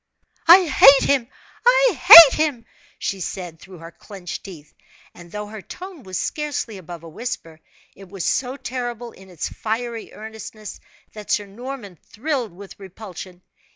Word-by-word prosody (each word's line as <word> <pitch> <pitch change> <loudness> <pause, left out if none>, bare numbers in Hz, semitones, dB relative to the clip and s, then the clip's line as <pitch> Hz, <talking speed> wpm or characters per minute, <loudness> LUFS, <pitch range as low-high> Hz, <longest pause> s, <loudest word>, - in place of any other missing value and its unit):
"I 360 +2 +8
hate 275 -2 +6
him! 270 -4 +1 0.4
I - - +4
hate 325 0 +10
him!" 260 -7 -4 0.3
she 195 - -4
said, 175 -2 -7
through 190 +1 -14
her 165 +1 -12
clenched 185 -1 -10
teeth 160 -7 -13 0.4
and 175 -1 -15
though 210 +1 -6
her 210 0 -10
tone 365 - -11
was 185 -5 -7
scarcely 285 -8 -4
above 175 -2 -11
a - - -11
whisper, 165 -4 -7 0.4
it 195 -1 -15
was 195 -2 -6
so 260 +1 -2
terrible 245 -2 -6
in 190 0 -17
its 175 -4 -6
fiery 230 +1 -5
earnestness 215 0 -10 0.3
that 210 -1 -11
Sir 205 - 0
Norman 220 -2 -10
thrilled 255 -1 -4
with 195 +3 -14
repulsion. 185 -2 -11
215 Hz, 155 wpm, -21 LUFS, 185-260 Hz, 0.4 s, hate